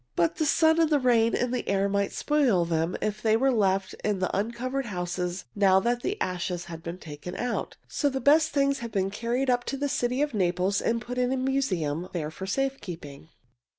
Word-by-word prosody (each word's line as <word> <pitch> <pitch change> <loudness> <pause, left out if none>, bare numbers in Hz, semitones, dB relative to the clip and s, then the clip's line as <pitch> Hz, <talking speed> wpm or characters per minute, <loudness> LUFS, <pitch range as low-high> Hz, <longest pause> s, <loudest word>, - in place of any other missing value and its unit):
But 170 -1 +1
the 310 - +1
sun 320 +2 +4
and 320 - +3
the 300 - +4
rain 235 -4 +3
and 250 0 0
the 250 - -2
air 200 0 +2
might 200 0 0
spoil 260 - +2
them 165 +1 -1
if 210 0 -2
they 220 0 +3
were 270 +3 +3
left 195 -4 +1
in 210 -2 +1
the 185 0 -1
uncovered 245 +5 -2
houses, 180 -1 -3
now 195 -2 +4
that 240 +3 0
the 410 - -2
ashes 180 -1 -2
have 165 -1 -8
been 170 +1 -6
taken 160 +1 -8
out. 245 0 -3
So 290 - 0
the 265 -1 -2
best 310 +3 +4
things 280 -2 +1
have 235 -1 -6
been 195 -2 0
carried 240 +5 0
up 245 0 +1
to 275 - -3
the 285 +1 -1
city 260 -1 0
of 295 -3 -2
Naples 185 0 +1
and 230 0 0
put 250 +1 -4
in 250 0 +2
the 265 - 0
museum 185 - -1
there 155 -3 -3
for 190 +4 -7
safe 270 +6 -1
keeping. 160 -4 -9
215 Hz, 220 wpm, -27 LUFS, 180-265 Hz, -, sun